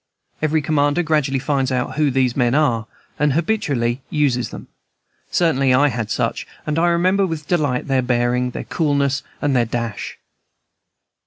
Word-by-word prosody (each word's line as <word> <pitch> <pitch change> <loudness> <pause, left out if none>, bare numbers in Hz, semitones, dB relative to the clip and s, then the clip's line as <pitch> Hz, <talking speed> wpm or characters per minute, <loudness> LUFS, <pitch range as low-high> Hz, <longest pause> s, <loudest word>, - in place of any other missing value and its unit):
Every 155 0 +1
commander 145 +2 +1
gradually 150 -4 +1
finds 135 -1 0
out 125 -1 -1
who 150 -1 +2
these 130 -2 +1
men 125 -1 +2
are, 120 -7 +1 0.3
and 150 -1 +2
habitually 140 - 0
uses 140 -5 +1
them; - - -10 0.6
certainly 135 -6 +2
I 145 +3 +4
had 115 -3 -3
such, - - -2 0.2
and 150 +1 0
I 175 - +3
remember 185 +3 +2
with 160 -3 -5
delight 145 -8 0
their 135 -2 +2
bearing, 125 0 +1
their - - -6
coolness, 140 -4 0 0.2
and 145 -2 +2
their 120 -2 +3
dash. 115 -2 -4
140 Hz, 155 wpm, -20 LUFS, 125-155 Hz, 0.6 s, I